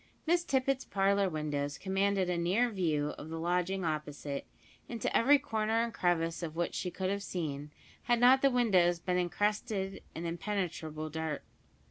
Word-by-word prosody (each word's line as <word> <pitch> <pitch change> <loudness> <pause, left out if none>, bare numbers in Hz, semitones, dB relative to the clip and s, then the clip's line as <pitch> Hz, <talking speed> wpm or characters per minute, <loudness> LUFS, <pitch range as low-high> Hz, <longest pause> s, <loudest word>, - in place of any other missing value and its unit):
Miss 340 +1 +3
Tippet's 270 -3 +1
parlour 195 0 +2
windows 145 -3 -2
commanded 195 0 +1
a 180 - 0
near 190 +8 +2
view 155 -7 0
of 155 - -8
the 165 - -4
lodging 180 +2 0
opposite, 150 -2 -3 0.4
into 230 -3 -2
every 280 +5 +6
corner 225 -4 0
and 235 -1 -3
crevice 165 -3 0
of 160 -2 -5
which 170 +1 -1
she 180 - -2
could 185 +1 -2
have 200 0 -2
seen, 150 -6 -4 0.4
had 240 -1 +3
not 255 +2 +6
the 275 - +5
windows 190 -9 +3
been 180 +1 0
encrusted 195 +1 -1
with 165 - -4
impenetrable 165 -4 -3
dirt. 160 -1 -3
185 Hz, 160 wpm, -32 LUFS, 165-215 Hz, 0.4 s, every